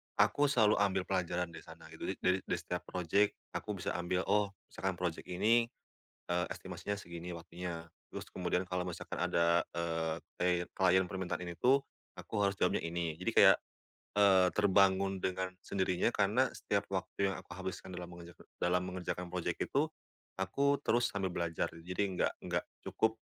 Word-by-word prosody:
aku 145 0 +4
selalu 110 -7 +4
ambil 95 -2 +2
pelajaran 90 -2 -1
dari - - -9
sana - - -13
gitu. - - -6
Jadi - - -1
dari 95 +1 +4
dari 90 - -2
setiap 90 +1 -4
project 95 +3 +2 0.2
aku 105 - -3
bisa - - 0
ambil, 90 +1 0
oh 100 -1 +2 0.2
misalkan 95 -1 -2
project 85 -2 -3
ini, 115 +6 +3 0.6
eee, 90 0 +1
estimasinya 100 0 -4
segini 85 -2 -7
waktunya, 85 0 -6 0.2
terus - - -6
kemudian 90 +1 0
kalau 90 0 -2
misalkan 90 -2 -5
ada, 85 0 +3 0.2
eee, 80 -1 -1 0.2
klie 90 -1 +2
klien 95 0 +4
permintaan 90 -1 -3
ini 85 - -5
tuh, 130 +10 +3 0.3
aku 105 - -3
harus 100 -1 +2
jawabnya 90 - +2
ini. 85 -1 -2
Jadi - - 0
kayak, - - +7 0.6
eee, 95 -3 +6
terbangun 95 -1 +4
dengan 95 0 -1
sendirinya 95 +1 +1
karena 110 +4 +2
setiap 100 -1 -2
waktu 95 +1 0
yang 95 - -4
aku - - -11
habiskan 95 0 -6
dalam 90 -1 -6
mengerjaka 85 -1 -12 0.2
dalam 90 +1 +2
mengerjakan 90 -1 -4
project 90 -1 -2
itu, - - +3 0.5
aku 140 +9 +2
terus 120 +2 +2
sambil 95 -2 -1
belajar, 85 -1 -1 0.2
jadi 90 +3 0
nggak - - +2
nggak - - -1 0.2
cukup, 110 0 +1
90 Hz, 165 wpm, -34 LUFS, 90-100 Hz, 0.6 s, kayak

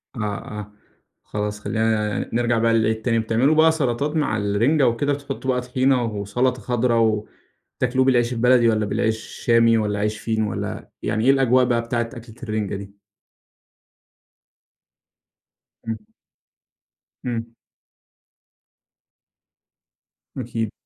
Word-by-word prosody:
آه، 115 - -4 0.4
آه، 105 0 -8 0.5
خلاص 105 0 -4
خلينا 110 -1 0
ن - - -5
نرجع 120 0 +2
بقى 115 0 +2
للإيه 110 -1 +3
التاني، 115 +1 0
بتعملوا 115 +7 +2
بقى 160 +1 +6
سلطات 145 0 -1
مع 145 -8 +1
الرنجة 115 +8 +2
وكده، 140 +5 +1
بتحطوا 140 -2 -3
بقى 125 0 0
طحينة 130 0 +1
وسلطة 115 +4 -1
خضرا 120 +1 +1 0.9
وتاكلوه 130 +1 +2
بالعيش 120 -2 +2
البلدي 120 0 +4
والّا 110 -1 +1
بالعيش 110 +2 0
الشامي 115 0 +2
والّا 105 -2 -1
عيش 105 +1 -1
فينو 110 0 -1
والّا - - -5
يعني 110 +1 -1
إيه 135 - +7
الأجواء 130 -2 +4
بقى 120 -1 +1
بتاعة 115 0 -2
أكلة 115 -3 -11
الرنجة 110 -3 -2
دي؟ 100 +1 -10 2.9
إمم. 115 - -2 1.3
إمم. 115 -1 -3 2.8
أكيد. 115 -3 -3
115 Hz, 120 wpm, -22 LUFS, 110-125 Hz, 2.9 s, إيه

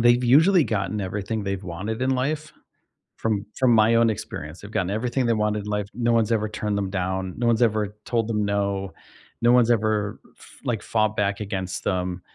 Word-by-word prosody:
They've 120 +1 +5
usually 160 +9 +5
gotten 105 -1 -2
everything 100 +3 -3
they've 100 -1 -3
wanted 100 +6 -4
in 130 - +1
life 150 +4 -1 0.6
from 110 -2 -1
from 130 -2 +4
my 110 +1 +5
own 115 0 +4
experience, 80 -6 -6
they've 105 - -10
gotten 95 -4 -1
everything 120 +5 -1
they 115 - +3
wanted 105 -1 0
in 105 - -9
life, 105 -1 -1
no 120 +1 +1
one's 115 -2 +2
ever 110 -1 +1
turned 105 -1 -2
them 95 -1 -2
down, 95 0 -2
no 120 - 0
one's 115 0 +3
ever 105 -2 +1
told 115 -2 0
them 105 -2 0
no, 100 -1 -1 0.5
no 120 +1 +5
one's 120 -1 +5
ever 110 -2 +1 0.2
f - - -15 0.2
like, 115 -4 -1
fought 110 -1 0
back 100 0 0
against 95 -3 -4
them, 90 -1 -1
105 Hz, 200 wpm, -24 LUFS, 100-115 Hz, 0.6 s, They've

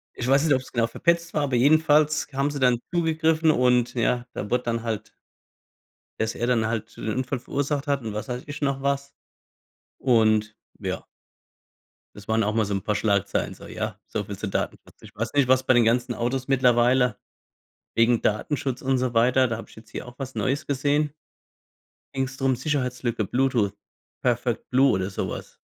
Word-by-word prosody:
Ich 125 - -3
weiß 135 +2 +4
nicht, 150 - +4
ob's 130 0 -5
genau 115 -1 +1
verpetzt 170 +7 0
war, 150 - +1
aber 135 -3 0
jedenfalls 155 +3 +4
haben 140 +2 +1
sie 145 - -4
dann 125 -2 +3
zugegriffen. 160 -1 +2
Und 125 -3 +2
ja, 120 0 0
da 105 - -5
wurde 125 0 +1
dann 115 -1 -2
halt 110 -3 -4 1.1
Dass 110 0 -1
er 120 - -1
dann 115 -3 +2
halt 110 -1 -4
den - - -6
Unfall 130 +1 -2
verursacht 145 +3 -2
hat 140 -1 +1
und 110 -3 -5
was 105 +4 -4
weiß 125 0 -4
ich 145 -1 -7
noch 140 -1 0
was. 140 0 -1 0.9
Und, 110 -3 +2 0.2
ja. - - -4 1.1
Das 105 0 -12
waren 110 0 +2
auch 105 +1 0
mal 110 -1 +2
so 100 - -3
'n 100 - -1
paar 105 +1 -1
Schlagzeilen. 100 -3 0
So, - - -12
ja. - - -5
So - - -3
viel - - -7
zu - - -4
Datenschutz. - - -4
Ich - - -14
weiß 110 +1 -3
nicht, 140 -3 +3
was 130 0 +4
bei 130 0 +4
den 120 - +5
ganzen 120 +1 +2
Autos 125 +3 -2
mittlerweile 125 -2 +3 0.8
wegen 115 0 +3
Datenschutz 130 +4 -1
und 135 0 +1
so 125 -1 -1
weiter, 125 +3 +4
da 115 -1 -2
habe - - -10
ich - - -17
jetzt 110 0 -15
hier - - -6
auch 125 - -11
was 135 -1 -6
Neues 135 +3 -1
gesehen. 145 +2 +1 1.0
Ging‘s 135 0 -2
drum, 135 -1 +1
Sicherheitslücke, 125 -4 -1
Bluetooth, 120 -2 +1 0.5
Perfect - - 0
Blue 135 +2 +5
oder 95 +1 -1
sowas. - - -5
125 Hz, 185 wpm, -25 LUFS, 115-140 Hz, 1.1 s, den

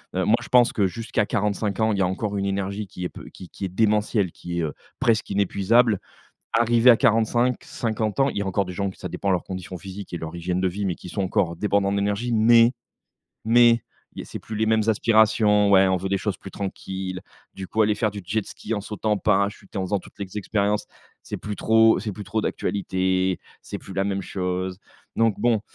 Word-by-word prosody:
heu, - - +1
moi, - - +5
je - - -10
pense 125 -1 +5
que 100 -3 +2
jusqu'à 110 +1 -2
45 105 -1 -1
ans, 110 -1 +2
il 100 - -2
y - - +2
a 90 - +3
encore 100 +2 -3
une 100 - -1
énergie 100 +1 -2
qui 90 0 -7
est - - -2
peu - - -11
qui 90 - -11
qui - - -10
est - - -3
démentielle, 105 -2 +1
qui 85 0 -5
est, - - 0
heu, 75 - -2 0.3
presque 110 -2 +1
inépuisable. 100 +3 +2 0.5
Arrivé 120 +1 +4
à 115 - +8
45-50 115 -1 0
ans, 135 +1 +4
il - - -6
y - - 0
a - - -3
encore 95 +1 0
des 90 - -7
gens 100 +2 -1
que 95 - -12
ça 90 - -6
dépend 100 - -5
de - - +4
leur 90 - -1
condition 95 -1 -6
physique 95 +2 -9
et - - -1
leur 80 +1 -7
hygiène 90 +1 -2
de 95 - +2
vie 100 +3 -3
mais 90 - -1
qui - - -12
sont 100 - -3
encore 90 -2 0
débordants 100 -1 +1
d'énergie 100 +4 -1
mais 115 +2 +6 0.7
mais 115 0 +5 0.3
il - - -7
y - - -4
a - - -10
c'est - - -7
plus 110 - -7
les 110 - +1
mêmes 110 0 +3
aspirations, 110 -2 +4
ouais, 95 -1 +6
on 95 0 +2
veut 95 +2 -4
des 100 - +1
choses 100 -1 -3
plus 95 - -10
tranquilles, 95 -1 -5 0.3
du 95 -1 -7
coup, 110 - +2
aller 105 0 +2
faire 110 0 0
du 100 -1 -8
jet 100 +3 -2
ski - - -7
en 105 - -2
sautant 105 +1 -2
en - - +2
parachute 100 -1 0
et - - -2
en 95 - -1
faisant 100 +2 0
toutes - - -16
les 100 +1 -5
expériences, 105 0 0 0.4
c'est - - -6
plus 105 -1 -6
trop 110 0 +4
c'est 105 -3 -4
plus 105 +1 -8
trop 110 +3 -1
d'actualité, 95 -3 -1 0.2
c'est - - -6
plus 95 - -11
la 95 0 0
même 100 -1 -2
chose 90 0 -3 0.4
donc 115 -2 +3
bon, 115 -3 +3
100 Hz, 240 wpm, -24 LUFS, 95-110 Hz, 0.7 s, à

